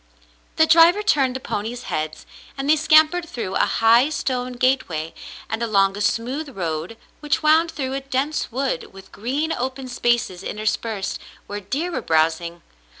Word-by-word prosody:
The 320 - +5
driver 335 +5 +6
turned 270 -10 +2
the - - -3
ponies' 235 +1 -4
heads, 155 0 -4 0.3
and 270 +1 -3
they 305 - +6
scampered 315 +2 +4
through 210 -6 -5
a - - +2
high 230 +5 +4
stone 255 -4 -2
gateway 245 -11 0 0.3
and 220 +1 -4
along 195 -4 +2
a 205 - -5
smooth 255 +5 -2
road 165 +4 -3 0.2
which 295 +1 -1
wound 320 +2 +4
through 265 -5 -4
a 270 - -1
dense 275 +2 -2
wood, 260 -7 -2
with 195 0 -14
green 280 +9 -2
open 260 +1 -4
spaces 240 -7 0
interspersed, 215 0 -3 0.3
where 205 - -5
deer 280 - -3
were 260 - -3
browsing. 165 0 0
250 Hz, 155 wpm, -22 LUFS, 205-295 Hz, 0.3 s, driver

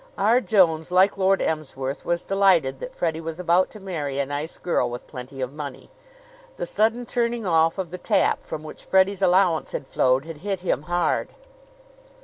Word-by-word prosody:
R. 230 +5 +3
Jones, 180 -7 +3
like 185 +2 +4
Lord 195 0 +2
Emsworth, 140 -3 -3
was 175 0 -1
delighted 185 -9 +2
that - - -8
Freddie 160 -1 -1
was 165 +1 -6
about 180 +1 +3
to 215 - -12
marry 155 -8 -4
a 140 - +1
nice 145 +3 -5
girl 125 -8 0
with 120 +1 -7
plenty 130 0 -8
of 130 +1 -3
money. 145 -3 -8 0.7
The - - -3
sudden 230 - +1
turning 235 -2 -1
off 165 -1 +3
of 185 -4 -4
the 180 - -6
tap 200 +1 +1
from 155 -1 -6
which 155 - -10
Freddie's 190 +1 +2
allowance 180 -3 +3
had 140 - -4
flowed 130 +2 +1
had 165 -2 -8
hit 195 +3 -3
him 180 - 0
hard. 175 0 0
175 Hz, 180 wpm, -24 LUFS, 150-195 Hz, 0.7 s, like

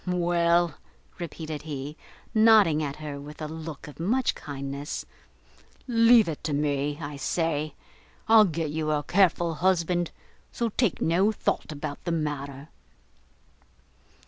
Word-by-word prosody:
"Well," 175 -1 +2 0.5
repeated 160 -3 -5
he, 145 -1 -6 0.4
nodding 215 -8 +6
at 140 -2 -3
her, 150 -2 -6
with 150 +1 -10
a 155 - -4
look 160 -2 -7
of 150 - -12
much 235 +10 +1
kindness, 140 +1 -5 0.8
"leave 230 -2 +6
it 160 -3 -5
to 150 - -1
me, 145 0 0
I 145 -2 -6
say; 155 +1 -1 0.5
I'll 220 -1 +8
get 165 -4 -2
you 155 0 -2
a 150 -1 +1
careful 175 -2 +2
husband, 175 0 +1 0.4
so 235 -1 -1
take 225 -3 0
no 185 +6 +3
thought 210 - -2
about 145 -1 -6
the 170 - -1
matter." 145 -3 -3
160 Hz, 130 wpm, -27 LUFS, 145-180 Hz, 0.8 s, I'll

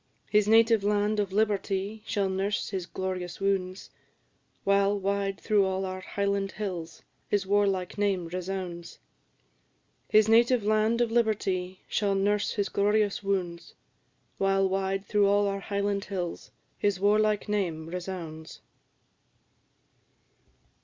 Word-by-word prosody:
His 210 -1 +4
native 225 -1 +5
land 210 +1 +1
of 200 -2 -1
liberty 205 0 -1
shall 200 -2 0
nurse 195 +2 -1
his 185 -3 -4
glorious 185 -2 -4
wounds, 195 -1 -2 0.7
While, 200 +1 +3
wide 195 0 -1
through 210 -2 +2
all 190 0 -1
our 185 0 -4
Highland 200 0 -2
hills, 175 -6 -5 0.2
his 205 -2 0
warlike 195 -2 0
name 195 -4 0
resounds; 180 -1 -5 1.1
His 215 0 +5
native 235 +1 +4
land 215 +2 +2
of 235 -2 +1
liberty 195 -5 0
shall 200 -1 0
nurse 205 +1 +1
his 205 -2 -1
glorious 205 0 +1
wounds, 185 -4 -3 0.6
While, 195 0 +2
wide 195 +1 -1
through 205 -1 +3
all 205 +1 +3
our 200 0 -2
Highland 200 0 -2
hills, 180 -4 -5 0.3
his 205 -3 +1
warlike 210 +1 +2
name 180 -7 -1
resounds." 170 -3 -7
200 Hz, 120 wpm, -28 LUFS, 190-205 Hz, 1.1 s, native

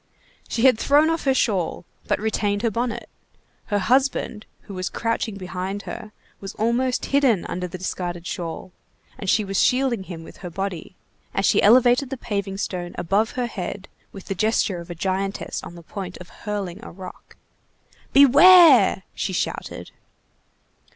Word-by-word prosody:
She 230 - -1
had 255 -4 +5
thrown 295 +3 +4
off 325 -2 -2
her 270 - +4
shawl, 190 -9 0 0.2
but - - +1
retained 205 -1 -1
her 230 - +1
bonnet; 235 +2 -3 0.6
her 205 - 0
husband, 245 0 0
who 200 - -11
was 185 0 -3
crouching 230 -2 -2
behind 190 +2 -5
her, 215 -3 -8 0.3
was 195 -1 -8
almost 240 +3 0
hidden 270 -9 +2
under 180 +1 -4
the 180 - -7
discarded 175 -1 -4
shawl, 175 0 -5 0.5
and 195 - -3
she 215 - +3
was 195 0 0
shielding 250 -6 +1
him 165 -3 -8
with - - -13
her 180 - -7
body, 190 -1 -5 0.4
as 195 - +1
she - - +4
elevated 245 +4 +5
the 270 - -4
paving 200 -4 -3
stone 175 -3 -4
above 200 +6 0
her 250 -1 -1
head 195 -3 -6 0.2
with 195 - -11
the - - -3
gesture 205 -2 0
of 170 +1 -10
a 175 - -6
giantess 195 +3 -3
on 170 - -10
the 170 - -12
point 185 +1 -7
of 180 - -12
hurling 205 -1 -5
a - - -8
rock. 185 0 -11 0.8
"Beware!" 285 - +7
she 190 - -3
shouted. - - -4
200 Hz, 165 wpm, -23 LUFS, 185-240 Hz, 0.8 s, Beware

